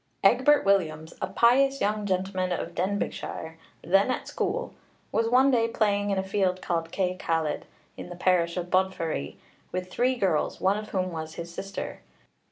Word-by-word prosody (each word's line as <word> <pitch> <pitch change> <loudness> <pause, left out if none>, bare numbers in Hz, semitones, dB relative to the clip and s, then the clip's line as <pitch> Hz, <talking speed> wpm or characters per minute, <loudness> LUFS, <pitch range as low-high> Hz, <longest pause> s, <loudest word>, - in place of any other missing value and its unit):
Egbert 260 +8 +5
Williams, 160 -5 +1
'a - - 0
pious 260 +7 +4
young 210 0 0
gentleman 185 -1 -1
of 170 -1 -3
Denbighshire, 180 -3 -3 0.3
then 195 +7 +3
at 255 - -2
school,' 435 +2 -2 0.4
was 225 0 +1
one 260 +3 +5
day 230 -3 +3
playing 205 -3 +1
in 195 - 0
a 190 - 0
field 190 -2 0
called 165 -2 -2
Cae 185 -1 0
Caled, 160 -2 -1 0.3
in - - -8
the 175 - -7
parish 175 -1 +2
of 180 0 -4
Bodfari, 185 - 0 0.4
with 185 0 -4
three 255 +5 +2
girls, 190 -10 0
one 190 +2 +3
of 215 - -8
whom 185 -1 -1
was 160 -1 -6
his 170 0 -7
sister. 195 +2 -6
190 Hz, 170 wpm, -27 LUFS, 175-215 Hz, 0.4 s, Egbert